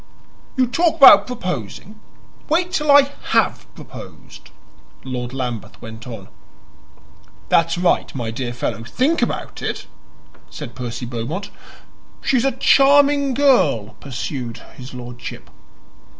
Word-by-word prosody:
"You 260 - +4
talk 330 +7 +1
about 275 - +8
proposing: 185 - -6 0.5
wait 345 +3 +1
till 300 -5 -1
I 280 0 +6 0.2
HAVE - - +1
proposed," - - -12 0.5
Lord 125 -2 -5
Lambeth 125 -4 -5
went 110 +1 -10
on. 110 -5 -8 1.2
"That's 165 +1 +2
right, 175 0 +1
my 120 -4 -3
dear 120 +1 -4
fellow; 120 -1 -4
think 260 - 0
about - - -3
it," - - -4 0.6
said 140 -6 -8
Percy 125 -1 -6
Beaumont. 125 - -5 0.7
"She's 260 -1 +1
a 270 - +1
charming 280 +1 +4
girl," 185 - +3
pursued 125 -3 -5 0.2
his 125 0 -10
lordship. 125 0 -9
150 Hz, 115 wpm, -20 LUFS, -, 1.2 s, about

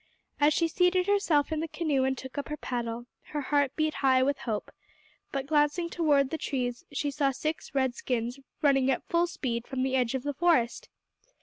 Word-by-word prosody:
As 295 +1 +5
she 335 - +2
seated 360 +2 +2
herself 360 -8 +2
in 315 - 0
the 325 - -2
canoe 295 -5 0
and 265 0 0
took 260 +1 -8
up 285 - -4
her 300 - -3
paddle, 240 -3 -4 0.3
her 295 - -1
heart 285 0 +1
beat 310 -1 +1
high 260 -2 +3
with 280 +1 0
hope, 220 -5 -3 0.6
but, 275 -1 -2
glancing 300 +3 +1
towards 290 -5 +2
the 320 - -2
trees, 245 -3 -2
she 285 +1 -1
saw 280 0 +1
six 305 +2 -4
red 260 -2 +2
skins 245 0 -2 0.2
running 270 -2 +4
at 265 - -1
full 340 +1 +3
speed 235 -8 -3
from 260 -1 -2
the 265 0 0
edge 250 -1 +1
of 260 - -3
the 290 0 -2
forest. 335 - +1
280 Hz, 200 wpm, -29 LUFS, 260-310 Hz, 0.6 s, As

